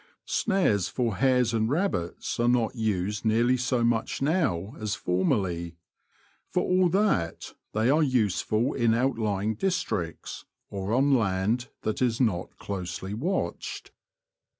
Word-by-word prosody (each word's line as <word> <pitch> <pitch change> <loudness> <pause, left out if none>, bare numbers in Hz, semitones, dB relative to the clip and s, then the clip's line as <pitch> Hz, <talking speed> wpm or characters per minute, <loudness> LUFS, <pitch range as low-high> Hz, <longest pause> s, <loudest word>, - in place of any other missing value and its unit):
Snares 180 - +1
for 115 -6 -1
hares 125 -3 +3
and 110 0 +1
rabbits 145 - -2
are 120 - +2
not 120 -2 +2
used 105 -2 -1
nearly 120 +3 +3
so 125 -1 0
much 115 -1 0
now 135 - 0
as 105 -2 -2
formerly. 90 -3 -1 0.7
For 180 - 0
all 180 -1 +3
that, 175 - 0 0.2
they 110 +2 +1
are 155 +2 +4
useful 115 - +1
in 115 -3 +2
outlying 110 -4 0
districts, 110 - -3 0.3
or 100 +1 -3
on 135 +4 +3
land 110 +1 +1
that 110 +2 -2
is 120 -2 +1
not 100 -8 0
closely 95 0 -5
watched. 170 - -3
115 Hz, 125 wpm, -27 LUFS, 100-130 Hz, 0.7 s, are